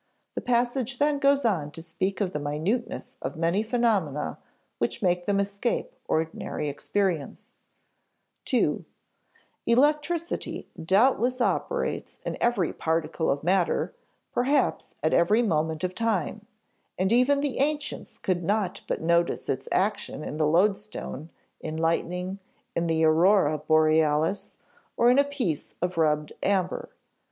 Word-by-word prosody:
The -, -, -3 dB
passage 245 Hz, +1 st, 0 dB
then 290 Hz, +1 st, +2 dB
goes 280 Hz, -1 st, +3 dB
on 170 Hz, -10 st, +1 dB
to 165 Hz, -, -7 dB
speak 190 Hz, +5 st, -2 dB
of 185 Hz, -2 st, -1 dB
the 150 Hz, -, -2 dB
minuteness 160 Hz, -, -2 dB
of 130 Hz, -, -4 dB
many 170 Hz, +5 st, +1 dB
phenomena 215 Hz, -, 0 dB, 0.4 s
which 120 Hz, 0 st, -1 dB
makes 175 Hz, -1 st, +1 dB
them 200 Hz, -1 st, +2 dB
escape 200 Hz, +4 st, -1 dB
ordinary 160 Hz, -1 st, -2 dB
experience: 170 Hz, +1 st, -2 dB, 0.9 s
(ii) -, -, +2 dB, 0.8 s
"Electricity 300 Hz, +7 st, +1 dB, 0.2 s
doubtless 245 Hz, +7 st, +3 dB
operates 240 Hz, -, -1 dB
in -, -, -2 dB
every 235 Hz, -8 st, +1 dB
particle 160 Hz, 0 st, -1 dB
of 140 Hz, +1 st, 0 dB
matter, 180 Hz, -, +1 dB, 0.4 s
perhaps 270 Hz, +2 st, +1 dB
at 155 Hz, -, +2 dB
every 210 Hz, +8 st, +4 dB
moment 160 Hz, -5 st, 0 dB
of 185 Hz, 0 st, -1 dB
time; 215 Hz, -1 st, -1 dB, 0.5 s
and 190 Hz, +4 st, +2 dB
even 255 Hz, +4 st, +4 dB
the 285 Hz, -4 st, -2 dB
ancients 295 Hz, +1 st, -1 dB
could 180 Hz, -2 st, -1 dB
not 200 Hz, 0 st, 0 dB
but -, -, -2 dB
notice 170 Hz, +1 st, +1 dB
its 130 Hz, 0 st, -2 dB
action 195 Hz, -5 st, 0 dB
in 150 Hz, -, -5 dB
the 155 Hz, -1 st, +2 dB
loadstone, 185 Hz, -3 st, 0 dB, 0.3 s
in 155 Hz, 0 st, -5 dB
lightning, 180 Hz, +3 st, -1 dB, 0.4 s
in 170 Hz, 0 st, 0 dB
the 160 Hz, 0 st, +2 dB
Aurora 160 Hz, -1 st, +4 dB
Borealis, 155 Hz, +3 st, +2 dB, 0.4 s
or 240 Hz, +1 st, +5 dB
in 255 Hz, -, +5 dB
a -, -, +6 dB
piece 260 Hz, -, -3 dB
of 180 Hz, +1 st, -1 dB
rubbed 150 Hz, -2 st, +1 dB
amber. 190 Hz, -2 st, 0 dB
185 Hz, 130 wpm, -26 LUFS, 160-235 Hz, 0.9 s, a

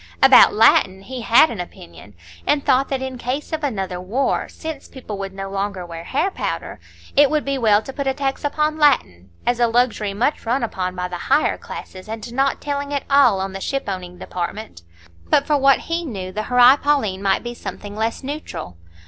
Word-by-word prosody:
About 270 Hz, -1 st, +8 dB
Latin 195 Hz, -3 st, +4 dB
he 255 Hz, +3 st, -7 dB
had 235 Hz, +7 st, +5 dB
an 220 Hz, -, -6 dB
opinion, 85 Hz, -, -12 dB, 0.3 s
and 290 Hz, -1 st, +1 dB
thought 270 Hz, 0 st, +3 dB
that 265 Hz, -1 st, -2 dB
in 260 Hz, -1 st, -6 dB
case 265 Hz, +7 st, -4 dB
of 315 Hz, -1 st, -2 dB
another 190 Hz, -9 st, -3 dB
war, 235 Hz, +9 st, -1 dB
since 315 Hz, -3 st, -7 dB
people 250 Hz, -6 st, -8 dB
would 195 Hz, -1 st, -4 dB
no 195 Hz, 0 st, -6 dB
longer 195 Hz, -1 st, -3 dB
wear 170 Hz, -1 st, -8 dB
hair 360 Hz, +9 st, 0 dB
powder, -, -, -4 dB, 0.4 s
it 285 Hz, 0 st, +6 dB
would 305 Hz, -1 st, 0 dB
be 275 Hz, -1 st, -1 dB
well 215 Hz, -2 st, +3 dB
to 270 Hz, -, -8 dB
put 280 Hz, 0 st, -3 dB
a 265 Hz, -, +2 dB
tax 270 Hz, -1 st, -2 dB
upon 305 Hz, +1 st, 0 dB
Latin, 95 Hz, -, +2 dB, 0.2 s
as 245 Hz, 0 st, +1 dB
a 240 Hz, -, +4 dB
luxury 225 Hz, -4 st, 0 dB
much 245 Hz, +8 st, 0 dB
run 240 Hz, +3 st, 0 dB
upon 185 Hz, -5 st, -3 dB
by 180 Hz, 0 st, -3 dB
the 175 Hz, -1 st, -7 dB
higher 285 Hz, +3 st, +3 dB
classes, 185 Hz, +2 st, -10 dB
and 225 Hz, +1 st, -6 dB
not 270 Hz, +2 st, +1 dB
telling 285 Hz, 0 st, -3 dB
at 285 Hz, -1 st, -1 dB
all 255 Hz, -8 st, +5 dB
on 190 Hz, 0 st, -3 dB
the 195 Hz, -, -6 dB
ship 275 Hz, +5 st, -2 dB
owning 180 Hz, -2 st, -5 dB
department. 180 Hz, -, -6 dB, 0.5 s
But, 280 Hz, -, +3 dB
for 295 Hz, -, +2 dB
what 275 Hz, 0 st, +4 dB
he 335 Hz, +1 st, -2 dB
knew, 195 Hz, -, -6 dB
the 215 Hz, +3 st, -4 dB
Horæ 250 Hz, +3 st, +6 dB
Paulinæ 265 Hz, -10 st, +1 dB
might 195 Hz, -1 st, +1 dB
be 240 Hz, 0 st, -5 dB
something 205 Hz, -3 st, -8 dB
less 225 Hz, +4 st, -2 dB
neutral. 275 Hz, -, -6 dB
240 Hz, 205 wpm, -21 LUFS, 195-275 Hz, 0.5 s, About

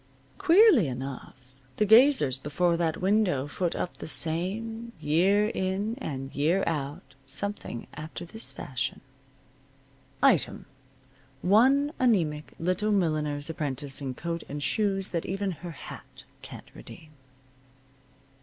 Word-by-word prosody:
Queerly 375 Hz, -, +6 dB
enough, 130 Hz, +1 st, -6 dB, 0.4 s
the 210 Hz, -, +2 dB
gazers 220 Hz, -, +5 dB
before 170 Hz, +5 st, 0 dB
that 165 Hz, -2 st, -1 dB
window 185 Hz, -8 st, +1 dB
foot 170 Hz, +3 st, -2 dB
up 175 Hz, -, -4 dB
the -, -, -7 dB
same, 215 Hz, +9 st, +1 dB
year 190 Hz, +8 st, +2 dB
in, 195 Hz, +2 st, -2 dB
and 135 Hz, -, -5 dB
year 165 Hz, +7 st, +1 dB
out, 140 Hz, -3 st, -4 dB
something 145 Hz, -, -4 dB
after 155 Hz, +3 st, -7 dB
this 220 Hz, +6 st, -2 dB
fashion: 130 Hz, 0 st, -4 dB, 1.2 s
Item: 255 Hz, -, +2 dB, 0.8 s
One 265 Hz, -, +4 dB
anemic 165 Hz, -12 st, +1 dB
little 185 Hz, +5 st, 0 dB
milliner's 155 Hz, -6 st, 0 dB
apprentice 145 Hz, -3 st, -3 dB
in 130 Hz, -2 st, -4 dB
coat 170 Hz, +2 st, -4 dB
and 145 Hz, 0 st, -5 dB
shoes 195 Hz, -1 st, 0 dB
that 170 Hz, -2 st, -3 dB
even 195 Hz, +1 st, -2 dB
her 175 Hz, +1 st, -8 dB
hat 160 Hz, -, -11 dB, 0.2 s
can't -, -, -11 dB
redeem. 155 Hz, -, -13 dB
175 Hz, 115 wpm, -27 LUFS, 145-210 Hz, 1.2 s, Queerly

